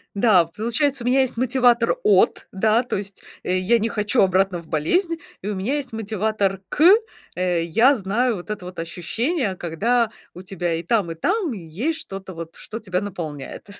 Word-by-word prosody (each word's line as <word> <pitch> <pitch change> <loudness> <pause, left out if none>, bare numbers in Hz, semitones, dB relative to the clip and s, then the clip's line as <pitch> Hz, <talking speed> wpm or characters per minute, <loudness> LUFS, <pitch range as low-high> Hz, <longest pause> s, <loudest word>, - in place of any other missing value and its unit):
Да. 200 -5 +5
Получается, 235 - -1
у - - -3
меня 265 +2 +4
есть 260 -3 -1
мотиватор 245 - +3
"от", 425 - +3
да, 220 +4 +2
то 245 - -2
есть 200 0 -7 0.2
я 185 +6 +2
не 225 +1 0
хочу 210 +3 +1
обратно 190 -1 +2
в 165 - -19
болезнь, 330 - 0 0.2
и 195 - -6
у 210 - -2
меня 205 +9 -1
есть 280 -3 -4
мотиватор 215 -3 -1
"к", 300 - 0 0.5
э, 180 -2 0
я 225 - +4
знаю 225 +3 0
вот 180 +1 -9
это 205 -4 -5
вот 180 0 -9
ощущение, 200 - -1
когда 220 +8 0 0.2
у 180 - -8
тебя 175 -3 -2
и 165 - -4
там, 190 -1 0
и - - -6
там, 360 - 0
и - - -6
есть 195 - -3
что-то 195 -1 -8
вот, 165 0 -8
что 220 - -7
тебя 185 -5 -2
наполняет. 165 -9 -6
205 Hz, 185 wpm, -22 LUFS, 180-240 Hz, 0.5 s, Да